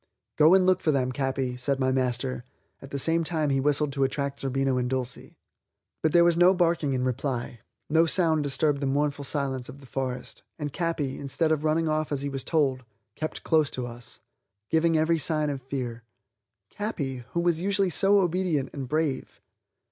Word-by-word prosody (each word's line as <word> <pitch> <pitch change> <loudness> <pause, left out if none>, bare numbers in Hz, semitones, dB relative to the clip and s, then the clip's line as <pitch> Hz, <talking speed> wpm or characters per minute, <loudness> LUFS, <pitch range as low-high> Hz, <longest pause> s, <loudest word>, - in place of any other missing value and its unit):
"Go 155 +4 +6
and 190 -1 +4
look 185 0 +3
for 155 - +2
them, 130 -3 0
Capi," 130 -1 -2
said 135 +2 -1
my 130 -1 +2
master; 130 -1 -1 0.4
at 135 - -10
the 140 - -4
same 165 +5 +3
time 155 -3 0
he 135 - +2
whistled 145 +1 +1
to 135 -1 0
attract 140 +1 -2
Zerbino 135 -1 0
and 125 0 -1
Dulcie. 130 -1 -4 0.6
But 160 - +2
there 170 +1 +6
was 170 -1 +4
no 180 +2 +5
barking 170 -5 +1
in 125 - -1
reply; 125 -2 -2 0.3
no 165 +2 +3
sound 160 -3 +3
disturbed 145 +1 +1
the 140 - 0
mournful 145 +1 0
silence 135 -3 -3
of 135 +2 -10
the 140 - -14
forest, 130 -1 -5 0.2
and 150 -3 -4
Capi, 165 -6 -2
instead 140 +4 -1
of 155 -1 +1
running 160 +1 +1
off 155 -1 -1
as 140 -1 -2
he 140 - -2
was 135 -2 -4
told, 135 -5 +1 0.3
kept 155 +6 -5
close 155 -3 +3
to 125 - -4
us, 120 -1 -8 0.5
giving 160 0 +3
every 160 +1 +2
sign 155 -1 0
of 135 -2 -5
fear. 125 -3 -5 0.7
Capi 150 - -3 0.2
who 170 - 0
was 170 -1 +1
usually 195 -1 +1
so 195 +3 +4
obedient 175 -5 0
and 135 -2 -5
brave! 155 -3 -2
145 Hz, 190 wpm, -26 LUFS, 130-160 Hz, 0.7 s, Go